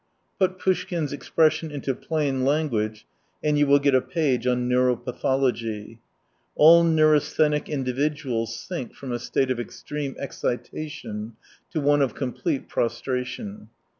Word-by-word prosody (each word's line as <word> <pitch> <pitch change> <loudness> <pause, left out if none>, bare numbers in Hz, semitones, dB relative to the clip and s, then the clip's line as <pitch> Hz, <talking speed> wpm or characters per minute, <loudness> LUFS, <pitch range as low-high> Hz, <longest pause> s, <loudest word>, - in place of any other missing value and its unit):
Put 185 -1 +2
Poushkin's 175 -5 -1
expression 155 +2 +1
into 140 -2 -2
plain 140 -2 -1
language, 120 -7 0 0.4
and 150 -1 +2
you 145 - +4
will 140 +1 +6
get 140 -1 +2
a 130 - +5
page 135 -7 0
on 125 0 +1
neuropathology. 125 -3 0 0.6
All 165 +3 +8
neurasthenic 155 -2 +3
indi 130 -4 -2
viduals 135 -4 -1
sink 170 -3 -6
from 135 -2 -7
a 120 - -2
state 130 +2 0
of 125 - -1
extreme 140 +3 -5
excita 140 +3 -4
tion 110 -5 -7 0.3
to 160 - -2
one 145 0 +3
of 135 - +1
complete 135 +2 -2
prostration. 120 -3 -3
135 Hz, 135 wpm, -25 LUFS, 125-150 Hz, 0.6 s, All